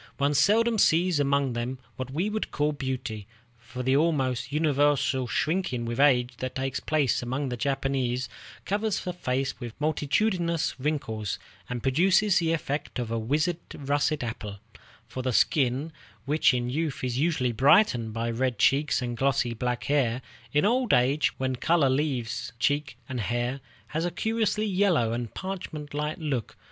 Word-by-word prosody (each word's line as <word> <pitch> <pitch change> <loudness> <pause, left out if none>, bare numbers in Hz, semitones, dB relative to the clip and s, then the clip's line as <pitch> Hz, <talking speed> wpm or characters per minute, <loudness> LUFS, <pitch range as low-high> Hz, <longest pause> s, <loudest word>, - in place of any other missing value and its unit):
One 140 +1 +2
seldom 220 +8 +3
sees 170 -2 +3
among 140 -2 +1
them 120 +2 -3 0.2
what 130 -1 -5
we 165 +9 -1
would 215 0 -2
call 150 +1 0
beauty, 130 -7 -4 0.3
for 125 +2 -7
the 130 +1 +2
almost 135 -5 +1
universal 145 -3 +2
shrinking 145 -4 -1
with 120 +2 -3
age 125 -4 +3
that 130 0 -4
takes 130 -1 -2
place 145 -5 +1
among 130 +3 -2
the 125 - -2
Japanese 130 -1 -1 0.4
covers 210 +1 0
the 180 - -3
face 135 -5 -2
with 120 -1 -8
multitudinous 170 +3 0
wrinkles, 110 - -2 0.3
and 125 -1 -4
produces 185 +8 +4
the 165 -1 +1
effect 150 -3 -2
of 120 -2 -3
a 115 - 0
withered 150 +9 0 0.2
russet 145 0 0
apple; 105 -3 -5 0.5
for 120 +2 -5
the 130 0 -1
skin, 135 +5 +2 0.3
which 150 +2 +4
in 120 -2 -1
youth 145 +1 -2
is 125 0 -1
usually 150 -6 +1
brightened 125 - +4
by 115 +1 -2
red 125 0 -1
cheeks 140 +3 +2
and 120 -1 -3
glossy 135 -2 +1
black 125 +1 -2
hair, 130 -4 +1 0.3
in 150 +5 +2
old 245 0 +3
age, 130 +3 +2
when 130 -1 -1
color 150 0 +2
leaves 130 -4 -2
cheek 145 +1 0
and 130 -1 -4
hair, 120 +4 -1 0.3
has 160 +2 -2
a 175 - 0
curiously 220 +3 0
yellow 180 - +2
and 120 -1 -4
parchment 175 -6 -6
like 150 +2 -2
look. 140 -8 -3
140 Hz, 160 wpm, -27 LUFS, 125-155 Hz, 0.5 s, produces